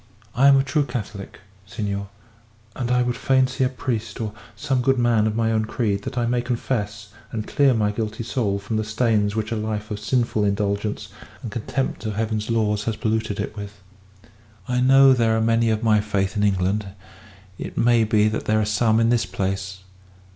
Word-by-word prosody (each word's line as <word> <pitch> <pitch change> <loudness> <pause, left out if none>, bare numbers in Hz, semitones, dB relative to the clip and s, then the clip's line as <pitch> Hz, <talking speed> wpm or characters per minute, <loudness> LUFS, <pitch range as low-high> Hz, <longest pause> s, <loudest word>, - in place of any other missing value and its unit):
I 135 +4 +4
am 140 -1 +7
a 135 - +3
true 140 +2 +1
Catholic, 110 -7 -6 0.3
senor, 100 -2 -4 0.7
and 120 -2 -3
I 125 0 +3
would 125 0 -1
fain 130 -1 +3
see 130 +1 -2
a 130 - +2
priest, 115 -4 -4
or 110 -2 -3 0.2
some 135 -3 -1
good 135 +2 +2
man 120 -3 +3
of 110 - -2
my 115 0 +1
own 110 -1 +1
creed, 105 -3 -1
that - - -5
I 120 - +1
may 120 +1 +1
confess, 105 -4 -3 0.2
and 110 -2 -4
clear 140 -3 +3
my 105 -2 +1
guilty 110 +1 -4
soul 110 -5 -1
from 100 +2 -3
the 110 - 0
stains 110 -2 +1
which 110 0 -2
a - - 0
life 110 -1 -4
of 105 - -3
sinful 115 -1 0
indulgence 100 +1 -1 0.3
and 115 - -5
contempt 125 +4 -3
of 105 - -3
Heaven's 110 0 -2
laws 105 -2 0
has 115 - -1
polluted 110 -1 -1
it 105 +1 -4
with. 100 -1 -8 0.9
I 125 0 0
know 135 +1 +7
there 115 -3 +2
are - - +1
many 115 +1 +2
of 110 +1 0
my 110 -2 +4
faith 100 -1 -1
in 105 - 0
England; 100 +1 +1 0.7
it - - -7
may 120 -1 +4
be 105 -1 +3
that 110 +1 -2
there 110 0 +2
are 110 - +1
some 110 +1 +2
in 115 0 +3
this 115 -5 +2
place. 95 0 -3
110 Hz, 200 wpm, -23 LUFS, 105-120 Hz, 0.9 s, am